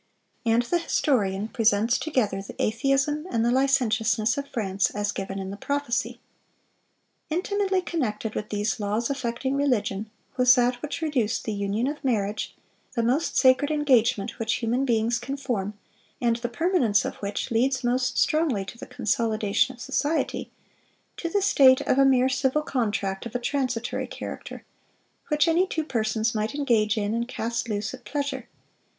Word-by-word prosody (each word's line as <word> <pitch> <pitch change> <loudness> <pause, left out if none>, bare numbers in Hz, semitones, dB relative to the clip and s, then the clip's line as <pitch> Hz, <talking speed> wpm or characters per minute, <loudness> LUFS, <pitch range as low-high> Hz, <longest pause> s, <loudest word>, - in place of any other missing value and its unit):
And 230 +1 +4
the 345 +8 0
historian 210 - 0
presents 225 +1 +2
together 225 -11 0
the 195 - -11
atheism 275 +7 +1
and 230 -6 +1
the 240 - +3
licentiousness 240 -4 +2
of 280 0 -4
France, 200 -6 0
as 205 0 -2
given 195 0 -5
in 190 0 -4
the 200 - -7
prophecy: 285 -1 -2 1.1
"Intimately 380 +2 0
connected 225 -11 -2
with 210 - -4
these 210 +2 -1
laws 215 +4 -1
affecting 265 0 -2
religion, 220 -7 0 0.3
was 250 -1 +6
that 245 -1 +1
which 300 +2 -4
reduced 245 -8 0
the 220 - -3
union 200 +3 -1
of 290 +2 -4
marriage—the 220 0 -3
most 265 +8 +1
sacred 260 +2 +5
engagement 245 -7 +2
which 225 0 0
human 245 +3 0
beings 235 -1 +1
can 270 +4 -5
form, 215 -7 -3 0.4
and 235 -1 +1
the 240 0 -3
permanence 250 - +2
of - - -4
which 200 +3 -4
leads 255 +3 +1
most 250 +1 0
strongly 300 -11 +2
to 235 +4 -10
the - - -8
consolidation 220 +1 0
of - - -22
society—to 300 +4 -4
the 400 +3 +1
state 270 -10 +6
of 265 - +1
a 275 - +6
mere 260 -1 +4
civil 265 +3 +1
contract 205 -6 -2
of 235 - -13
a - - +1
transitory 255 -2 -2
character, - - -8 0.6
which 300 +1 +2
any 345 +3 +3
two 320 -3 -2
persons 220 -4 0
might 215 +4 -2
engage 230 -7 +2
in 205 0 0
and 235 +1 -1
cast 235 -1 -3
loose 210 0 -2
at - - -10
pleasure.... 280 -4 -3
240 Hz, 155 wpm, -25 LUFS, 215-275 Hz, 1.1 s, was